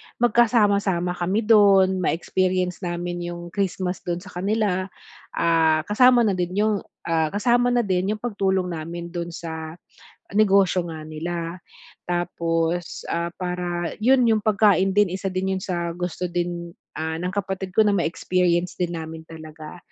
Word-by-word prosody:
magkasama-sama 205 -6 +2
kami 185 +5 -1
dun, 195 -4 +5
ma-experience 180 +1 0
namin 175 -1 -4
yung 175 0 -6
Christmas 185 -1 -2
dun 175 +1 -4
sa 200 - -12
kanila. 195 0 0 0.5
Ah, 160 -2 +3
kasama 240 +5 +5
na 210 - +2
din 180 +1 -2
‘yong, 210 0 +2 0.2
ah, 165 -1 +1
kasama 240 +7 +2
na 245 -1 +2
din 190 +1 0
‘yong 215 - -15
pagtulong 190 -5 0
namin 170 +1 -6
do’n 170 -1 -4
sa 160 -1 -6 0.6
negosyo 195 -4 +4
nga 160 -2 -7
nila. 165 +2 -5 0.5
Tapos, 170 -1 -2
ah, 170 0 -2
para 180 -1 -3
‘yon 255 +4 +4
‘yong 220 -1 +2
pagkain 200 -3 +3
din, 205 -2 +4
isa 195 +2 -3
din 190 +1 -1
yun 185 - -6
sa 170 -2 -3
gusto 180 +1 -4
din, 175 -1 -3 0.2
ah, 160 0 -2
ng 180 - -1
kapatid 190 -1 -3
ko 220 - +6
na 205 - +3
ma-experience 180 -1 0
din 175 -1 -2
namin 160 0 -7
talaga. 155 0 -10
180 Hz, 150 wpm, -23 LUFS, 170-200 Hz, 0.6 s, ko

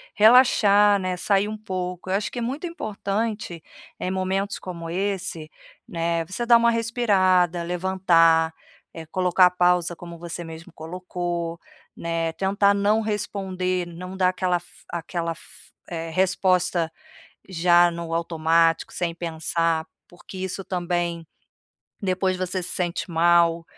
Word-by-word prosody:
relaxar, 210 -3 +6
né, 185 -1 -2
sair 200 +2 +1
um 215 - -5
pouco. 185 -3 -5
Eu 190 - +1
acho 205 - -2
que 245 - -5
é - - -3
muito 265 +9 -3
importante, 210 - -3 0.4
eh, - - -2
momentos 190 +1 -1
como 170 -3 -7
esse, 180 -4 -3 0.4
né, 170 0 -1
você 190 +8 -4
dar 235 0 +6
uma 235 0 +3
respirada, 190 -7 +2
levantar, 170 -2 +3 0.4
eh, 165 -1 -8
colocar 180 +2 +4
a 180 - -1
pausa 180 -1 +2
como 170 0 -10
você 170 0 -6
mesmo 165 0 -10
colocou, 175 0 -4 0.4
né. 165 -1 -2
Tentar 200 +2 +2
não 205 +2 +2
responder, 190 -4 -2
não 180 +2 -8
dar 185 -1 +3
aquela 185 -1 0
f 175 - -14 0.2
aquela 170 0 -3
f - - -17 0.4
eh, 165 -1 -4
resposta 180 -2 +1 0.6
já 175 -1 +4
no 170 -1 -5
automático 165 0 +2
sem 170 -2 -2
pensar. 165 -1 -1 0.2
Porque 175 +2 -12
isso, 190 +1 -4
também, 175 -2 -2 0.8
depois 185 0 0
você 185 0 -2
se - - -4
sente 175 0 -2
mal, 170 0 +3
180 Hz, 135 wpm, -24 LUFS, 170-195 Hz, 0.8 s, relaxar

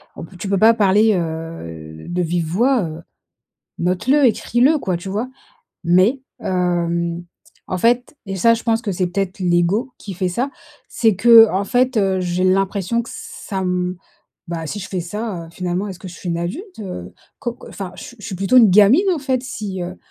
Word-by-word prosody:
oh - - -8
b 165 - -12
tu 195 +2 -5
peux 195 - +2
pas 220 +4 +6
parler, 210 0 +4
heu, 160 - -6
de 180 +1 -1
vive 170 -1 -1
voix, 235 +7 +2
heu, 160 0 -6 0.8
note-le, 250 +12 +2
écris-le 250 +5 +2
quoi», 185 -9 -1
tu 180 +3 -7
vois? 215 +6 -2 0.6
Mais, 185 +10 +3 0.2
hem, 170 -1 -1 0.5
en 185 - -2
fait 245 - +1
et 195 0 -4
ça 230 +5 +4
je 230 - -5
pense 225 -1 +1
que 205 -4 -2
c'est 185 0 0
peut-être 190 +1 -3
l'ego 180 +8 +1
qui 195 - -8
fait 180 +1 -1
ça, 245 +10 -2 0.4
c'est 225 -3 +2
que, 225 +3 +8
en 195 +2 0
fait, 250 +3 +1
heu, 190 -2 +1
j'ai 180 0 -1
l'impression 195 +4 +1
que 235 - -10
ça 195 - -7
m 180 0 -1 0.5
bah, 165 -1 -4
si 205 - -4
je 200 - -7
fais 185 - -3
ça, 185 -1 -5
heu, - - -14
finalement 180 +3 -3
est-ce 185 -3 -8
que - - -10
je 175 - -10
suis 180 - -8
une 170 -1 -1
adulte, 320 - -5
heu? 90 - -7 0.3
Co 240 -1 -4
c - - -11
enfin, 190 -3 -7
je - - -10
je 210 - -12
suis 190 - -5
plutôt 195 +7 +4
une 225 -5 +7
gamine 215 - +6
en 340 - -1
fait, 260 -3 -1
si, 210 -7 -5
heu, 180 +1 -6
190 Hz, 205 wpm, -20 LUFS, 175-230 Hz, 0.8 s, que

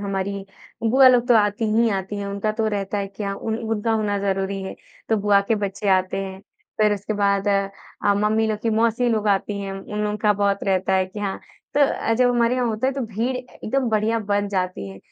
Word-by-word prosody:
हमारी, 195 0 -3 0.4
बुआ 260 +3 +6
लोग 245 -1 +4
तो 240 - +6
आती 205 +1 +1
ही 230 +1 +4
आती 195 0 -3
हैं 200 0 -4
उनका 200 +2 -2
तो 220 0 -1
रहता 205 0 -2
है 200 - -2
कि 200 +1 -7
उन 220 +3 -3
उनका 225 0 -1
होना 210 -2 0
ज़रूरी 195 0 -1
है, 190 - -6 0.3
तो 220 - +3
बुआ 200 -1 +4
के 225 - +3
बच्चे 200 0 -3
आते 185 -1 +2
हैं। 190 0 -8 0.4
फिर 210 -1 +4
उसके 205 +2 -4
बाद 200 0 +1
अ, 195 0 -1
मम्मी 215 +2 +2
लोग 215 -1 -1
की 230 - +1
मौसी 230 +2 +2
लोग 215 -2 +1
आती 200 0 0
हैं, 195 -1 -4
उन 210 +2 -4
लोग 210 0 -2
का 210 -1 +4
बहुत 200 0 0
रहता 190 0 +1
है 190 0 +2
कि 205 +2 -8
हाँ, 195 -2 -3 0.3
तो 290 - +3
अ, 270 -4 +2
जब 245 +1 +3
हमारे 240 0 +2
यहाँ 250 -1 0
होता 225 +2 -1
है 270 - +1
तो 275 - -4
भीड़ 230 +5 -2
ए 250 0 -7 0.2
एकदम 265 +2 0
बढ़िया 220 +1 +1
बढ़ 205 -1 0
जाती 185 - -2
है 95 0 -10
205 Hz, 230 wpm, -22 LUFS, 195-225 Hz, 0.4 s, बुआ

